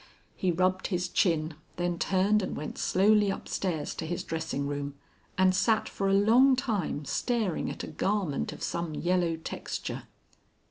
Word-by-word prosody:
He 185 - +1
rubbed 185 +2 +1
his 180 -2 -1
chin, 165 -3 +1 0.2
then 175 -1 -1
turned 195 +3 +3
and 185 - -3
went 150 - -5
slowly 205 +2 +4
upstairs 180 -4 -2
to 160 - -5
his 175 +1 -3
dressing 160 -3 -3
room, 145 0 -3 0.4
and 185 0 +5
sat 220 +4 +2
for 195 -1 -1
a - - +3
long 240 +7 +6
time 205 - -2
staring 220 - -1
at - - -6
a - - -5
garment 195 -8 -1
of - - -8
some 170 -2 -2
yellow 175 0 +1
texture. 160 - -5
185 Hz, 155 wpm, -29 LUFS, 165-205 Hz, 0.4 s, long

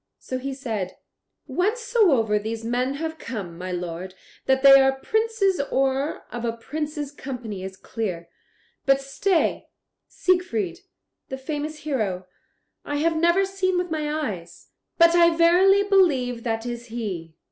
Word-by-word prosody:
So 255 - -5
he 270 +1 -4
said: 220 -9 -4 0.5
"Whencesoever 385 - +2
these 225 +2 -5
men 250 +3 0
have 320 +1 -4
come, 195 -9 -6
my 185 +2 -6
lord, 180 +1 -5 0.3
that 265 0 +2
they 275 0 +9
are 270 0 +4
princes 440 -3 +1
or 270 +2 0
of 240 -1 -5
a 235 - 0
prince's 295 +4 -5
company 245 -9 -6
is 190 0 -7
clear. 185 -6 -4 0.6
But 275 0 +5
stay; 320 +6 0 0.4
Siegfried, 230 - 0 0.5
the 265 - -4
famous 300 +3 -5
hero, 205 -11 -1 0.6
I 290 - -4
have 325 +3 +1
never 340 +4 +3
seen 380 -1 0
with 355 -1 -2
my 305 -1 -1
eyes, 205 - -5 0.3
but 335 0 +6
I 340 -1 +5
verily 370 +4 +5
believe 290 -12 +2
that 225 0 -1
is 240 0 -5
he. 190 -9 -5
270 Hz, 140 wpm, -24 LUFS, 225-335 Hz, 0.6 s, they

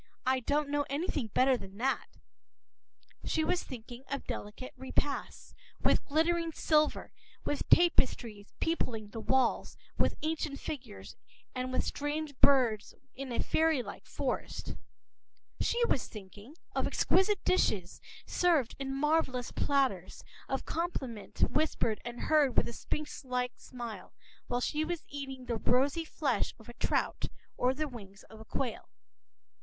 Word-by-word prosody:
I> 260 +1 +4
I - - -1
don’t 290 +4 +1
know 290 0 +1
anything 285 -3 -1
better 255 +5 +4
than 195 -4 -8
that,” 265 +4 0 1.2
she 315 - +1
was 355 +3 +1
thinking 240 0 -8
of 275 - -3
delicate 210 +5 -6
repasts, 265 +2 -2 0.3
with - - +3
glittering 330 +2 +2
silver, 305 -1 +2 0.3
with 290 - -2
tapestries 235 -11 +4
peopling 230 -10 -1
the 225 - -6
walls 260 +1 +2 0.2
with - - +2
ancient 310 -2 -1
figures 250 -8 -6 0.4
and 255 0 -2
with 255 - +1
strange 295 0 -2
birds 250 -7 +4 0.2
in 270 -1 -6
a 235 - 0
fairy 320 -5 +3
like - - -9
forest; - - -3 0.9
she 475 0 +2
was 270 - +1
thinking 210 +6 -11 0.2
of - - +2
exquisite 400 +2 +3
dishes, 195 - +2 0.2
served 325 -9 +2
in 270 0 -2
marvelous 300 -5 +2
platters, 265 -11 +1 0.3
of 270 - -1
compliment 265 - -3
whispered 295 -8 +2
and 240 0 -6
heard 300 -5 +3
with - - +5
a 235 - -5
sphinx 300 +6 -4
like 250 -1 -1
smile, 235 -6 -8 0.3
while 245 0 0
she 300 +4 +1
was 335 0 -2
eating 270 -2 -6
the 235 -2 -1
rosy 275 +8 +2
flesh - - 0
of - - -16
a - - -8
trout - - 0 0.3
or 250 - +3
the 300 +3 -2
wings 200 -7 -10
of 220 - -11
a 220 - -11
quail. 245 -1 -3
265 Hz, 140 wpm, -32 LUFS, 240-305 Hz, 1.2 s, with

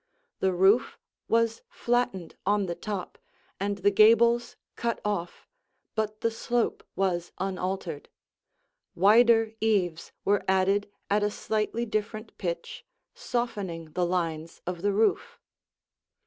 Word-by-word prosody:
The 190 - +2
roof 190 +6 +3 0.3
was 230 0 +1
flattened 240 -8 -1
on 205 0 +2
the 175 - -2
top, 200 0 -6 0.4
and 200 +1 -1
the 200 +1 +3
gables 230 +3 +5 0.2
cut 235 -1 -2
off, 200 -5 -3 0.5
but 215 -1 -2
the 230 - +1
slope 235 +1 -1
was 175 -3 -1
unaltered. 185 -4 -3 0.9
Wider 225 +3 +5
eaves 185 -7 0
were 200 0 +2
added 195 +2 +2 0.2
at 205 +1 +3
a 205 - +2
slightly 220 +2 -2
different 215 0 -4
pitch, 170 -3 -4 0.3
softening 205 - -3
the 180 +3 -1
lines 165 -2 -2
of 175 -1 -4
the 205 +1 +2
roof. 215 +2 +1
205 Hz, 120 wpm, -27 LUFS, 185-225 Hz, 0.9 s, gables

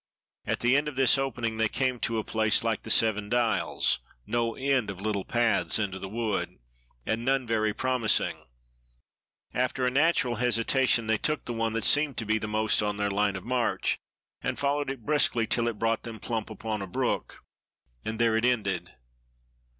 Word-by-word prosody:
At - - -1
the 120 +2 +4
end 145 +1 +2
of 150 - -4
this 130 -2 +5
opening 120 -4 -2
they 110 -1 +2
came 130 0 -1
to 115 0 -1
a 110 - -1
place 110 +1 +2
like 115 -2 0
the - - -9
"Seven 105 -2 +2
Dials" 115 -4 +1 0.3
no 115 +1 -1
end 135 -4 +1
of 95 -2 -6
little 100 -1 -2
paths 120 +2 +1
into 100 -3 -2
the 95 - -6
wood, 110 0 -2 0.5
and 115 +1 -1
none 135 0 +1
very 110 -2 +1
promising. 125 0 0 1.1
After 125 +1 0
a 125 - +2
natural 140 -4 +2
hesitation, 120 +1 +2
they 110 0 +1
took 155 -2 -1
the 120 - -3
one 115 -1 -1
that 115 -1 -1
seemed 145 0 +3
to 115 - -2
be 110 +1 +1
most 110 0 +1
on 105 -1 -1
their 105 0 0
line 100 0 +1
of 95 - -7
march, 125 0 0 0.4
and - - -2
followed 140 0 0
it 135 -5 -6
briskly 140 -6 +2
till 120 +1 0
it 115 -3 -2
brought 115 +1 0
them 115 -2 -8
plump 115 -3 -3
upon 110 -2 -4
a 95 - -5
brook, 90 - -2 0.6
and 110 +1 -4
there 115 -1 +3
it 110 - +1
ended. 100 -8 0
115 Hz, 185 wpm, -28 LUFS, 110-125 Hz, 1.1 s, this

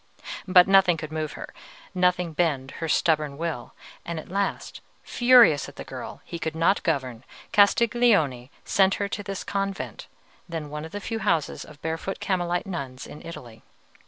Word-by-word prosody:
But 180 -1 +7
nothing 195 -3 +5
could 155 -1 -7
move 155 -1 -3
her, - - -9 0.4
nothing 180 -2 +1
bend 145 -5 0
her 165 - -2
stubborn 150 -4 +1
will; 160 -6 -4 0.3
and 170 -1 -5
at - - -11
last, 200 0 -2 0.2
furious 240 - +5
at - - -15
the - - -7
girl - - -8
he 170 - -6
could 160 -1 -3
not 165 +5 +2
govern, 130 -7 -2 0.3
Castiglione 200 - +3 0.2
sent 195 0 +3
her 200 - -2
to 205 - -4
this 195 -1 -5
convent, 195 -1 -4 0.4
then 160 -3 -5
one 150 +1 -5
of 160 - -10
the 205 - -5
few 225 +3 -4
houses 165 -8 0
of 150 -1 -14
barefoot 165 +4 -3
Carmelite 175 -2 -1
nuns 140 -9 -6
in 150 - -11
Italy. 125 -9 -10
170 Hz, 165 wpm, -25 LUFS, 150-195 Hz, 0.4 s, But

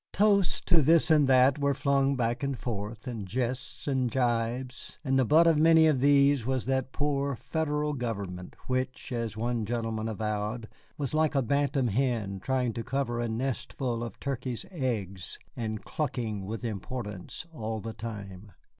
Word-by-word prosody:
Toasts 200 -3 +3
to 170 -3 +4
this 160 +2 +5
and 150 -3 +5
that 130 +2 +5
were 140 -1 +2
flung 140 0 +2
back 120 -1 0
and 140 -2 -1
forth, 110 -1 -5
and 115 -6 -5
jests 125 +6 -3
and 130 -3 +1
gibes, 120 0 -1
and 135 -2 +2
the 130 - +4
butt 160 +8 +6
of 165 -3 +4
many 160 0 +6
of 150 -4 +3
these 140 -1 +5
was 130 +1 -1
that 130 0 0
poor 140 -1 0
Federal 150 +1 -1
government 100 -8 -4
which 130 0 -2
(as 115 -3 -3
one 120 0 -1
gentleman 115 -1 -2
avowed) 110 +1 -2 0.3
was 140 -1 -2
like 155 -1 +2
a 135 - +3
bantam 140 0 +1
hen 110 -4 0
trying 125 +1 0
to 115 - -4
cover 130 -1 -1
a 120 -1 -1
nestful 120 0 -2
of 120 - -7
turkey's 130 -3 -3
eggs, 105 - -3 0.2
and 110 -3 -4
clucking 115 -9 -2
with 115 +3 -4
importance 105 - -5
all 110 -5 -3
the 110 +1 -6
time. 100 -3 -8
125 Hz, 165 wpm, -29 LUFS, 110-140 Hz, 0.3 s, butt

